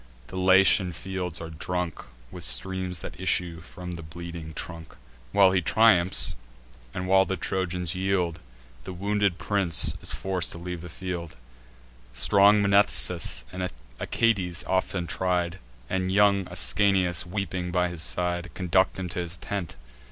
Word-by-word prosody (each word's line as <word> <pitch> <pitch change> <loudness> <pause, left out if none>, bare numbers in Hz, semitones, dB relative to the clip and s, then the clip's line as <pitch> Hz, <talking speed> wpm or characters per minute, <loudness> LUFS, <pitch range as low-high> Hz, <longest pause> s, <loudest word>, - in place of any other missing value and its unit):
The - - -9
Latian 95 0 +4
fields 90 0 -5
are 80 0 -7
drunk 90 +1 -4 0.3
With 90 - -7
streams 95 -1 +1
that - - -9
issue 85 -2 +1
from 90 +1 -9
the 85 -1 -6
bleeding 85 0 -8
trunk. 80 -3 -8 0.4
While 95 +3 +5
he 95 -1 +2
triumphs, 95 -2 +3 0.6
and 90 +5 -5
while 95 0 +5
the 95 0 -3
Trojans 90 -2 -2
yield, 90 -3 -1 0.4
The 95 - -7
wounded 100 0 0
prince 95 -6 +1
is - - -1
forc'd 95 -3 0
to - - -8
leave 85 0 -6
the 90 - -9
field: 85 -2 -6 0.8
Strong 100 +9 +5
Mnestheus, 100 -4 +2
and 90 0 -3 0.3
Achates 95 -7 0
often 95 -1 -1
tried, 90 0 -1 0.3
And 95 +2 -1
young 100 -1 +3
Ascanius, 95 -4 +2
weeping 90 -2 -3
by 90 0 +1
his 85 -2 -6
side, 90 0 -1
Conduct 95 0 +1
him 95 -1 -4
to 85 - -4
his 85 0 -2
tent. 100 -3 -5
90 Hz, 145 wpm, -26 LUFS, 85-95 Hz, 0.8 s, While